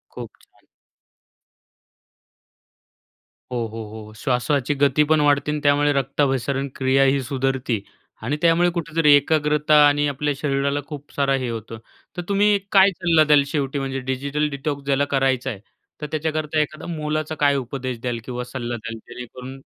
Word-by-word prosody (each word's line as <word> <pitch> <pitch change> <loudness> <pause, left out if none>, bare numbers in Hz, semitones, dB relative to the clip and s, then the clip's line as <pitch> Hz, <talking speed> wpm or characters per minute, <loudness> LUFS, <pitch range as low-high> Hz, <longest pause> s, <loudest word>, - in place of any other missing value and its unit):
खूप - - -7
छान. - - -29 2.9
हो, 120 -2 -1
हो, 110 0 -7 0.2
हो. 110 - -13
श्वासाची 130 +4 0
गती 140 +1 +3
पण 155 - +4
वाढते 145 0 +2
आणि 150 - -2
त्यामुळे 145 0 +3
रक्ताभिसरण 135 0 0
क्रियाही 135 +1 +2
सुधरते. 130 -3 -1 0.4
आणि 145 - -2
त्यामुळे 170 +1 +4
कुठेतरी 165 -2 +3
एकाग्रता 150 +1 +2
आणि 145 0 +2
आपल्या 145 +1 -1
शरीराला 140 0 0
खूप 145 -2 -9
सारा 140 -1 +1
हे 130 -2 -2
होतो. 115 0 -6 0.4
तर 175 - -1
तुम्ही 205 0 +3
काय 195 0 +7
सल्ला 170 -4 +3
द्याल 150 -2 +5
शेवटी 140 -2 -2
म्हणजे 135 -1 -3
डिजिटल 140 +3 -1
डिटॉक्स 140 0 -4
ज्याला 140 0 +2
करायचा 135 -1 +1
आहे. 105 -6 -6 0.4
तर - - -3
त्याच्याकरता 155 0 -1
एखादा 150 0 -5
मोलाचा 155 0 -3
काय 145 -1 +3
उपदेश 130 -2 -4
द्याल 120 -1 -3
किंवा 125 -1 -4
सल्ला 120 -1 -5
द्याल. 115 0 -7
जेणेकरून 125 +2 -9
140 Hz, 145 wpm, -22 LUFS, 130-150 Hz, 2.9 s, काय